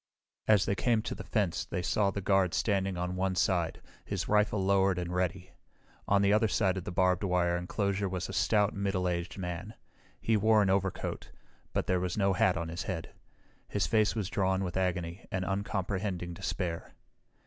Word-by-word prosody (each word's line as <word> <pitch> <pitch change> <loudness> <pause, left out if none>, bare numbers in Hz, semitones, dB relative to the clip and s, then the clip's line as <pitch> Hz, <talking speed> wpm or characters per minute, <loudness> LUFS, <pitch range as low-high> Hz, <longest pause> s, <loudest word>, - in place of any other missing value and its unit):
As 105 -3 +5
they - - +1
came 110 +1 +1
to - - -3
the - - -7
fence 100 -6 0
they 90 - -4
saw 100 +2 +2
the 100 +1 -3
guard 95 -2 +2
standing 95 -3 0
on 90 +1 -2
one 95 0 0
side, 90 -3 0 0.2
his 95 -5 -3
rifle 105 0 +2
lowered 95 -1 +3
and 90 0 -3
ready. 90 0 -2 0.6
On 100 0 +3
the 100 +1 +4
other 110 +1 +4
side 95 -3 +1
of 95 - -5
the - - -4
barbed 90 +1 +2
wire 90 -2 +2
enclosure 100 +2 -1
was 90 -1 -3
a 95 - -7
stout, 105 -1 +2
middle 95 -2 -1
aged 85 -1 -3
man. 90 +3 -5 0.4
He 115 - +1
wore 110 0 +4
an 95 - +2
overcoat, 95 -1 -2 0.4
but - - -1
there 90 -1 +1
was 90 +1 -2
no 100 -2 +3
hat 95 -2 +3
on 85 -1 -3
his 85 +3 -4
head. 90 -3 -5 0.5
His 100 -4 0
face 110 +5 +2
was 105 -5 -1
drawn 95 -1 +1
with 90 -2 -4
agony 90 -1 -2
and 95 -1 -1
uncomprehending 95 -2 -2
despair. 85 -2 -4
95 Hz, 190 wpm, -30 LUFS, 90-100 Hz, 0.6 s, As